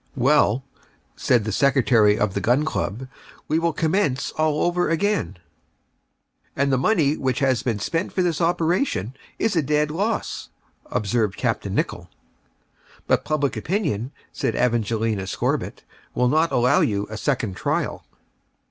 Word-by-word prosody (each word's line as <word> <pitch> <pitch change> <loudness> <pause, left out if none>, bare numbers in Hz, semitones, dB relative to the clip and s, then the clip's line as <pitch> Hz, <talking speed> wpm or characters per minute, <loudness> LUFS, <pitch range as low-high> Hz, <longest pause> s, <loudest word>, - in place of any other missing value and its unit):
"Well," 130 -2 +3 0.5
said 120 -4 +2
the 110 - -3
Secretary 120 -4 +3
of 105 -3 0
the 100 - -2
Gun 125 +9 +2
Club, 130 -4 -3 0.4
"we 155 +2 +1
will 170 0 +1
commence 155 -4 0
all 155 -1 0
over 175 0 +1
again." 165 - 0 1.2
"And 140 0 +1
the - - +3
money 160 -4 +3
then - - -8
which 130 -2 0
has 130 -5 +1
been 115 -4 -1
spent 165 - -2
for 185 - 0
this 170 -3 0
operation 165 - 0 0.2
is 225 -3 0
a 165 - +3
dead 150 +1 +1
loss," 205 +7 -2 0.4
observed 105 -1 -1
Capt. - - -1
Nicholl. - - -2 1.0
"But - - +2
public 145 -3 -1
opinion," 140 - -2 0.2
said - - -1
Evangelina 115 -4 0
Scorbitt, - - -2 0.3
"would 125 0 +2
not 160 +2 +2
allow 125 +3 +3
you 100 -1 0
a - - -5
second 115 -5 -1
trial." - - -2
135 Hz, 145 wpm, -23 LUFS, 115-160 Hz, 1.2 s, Well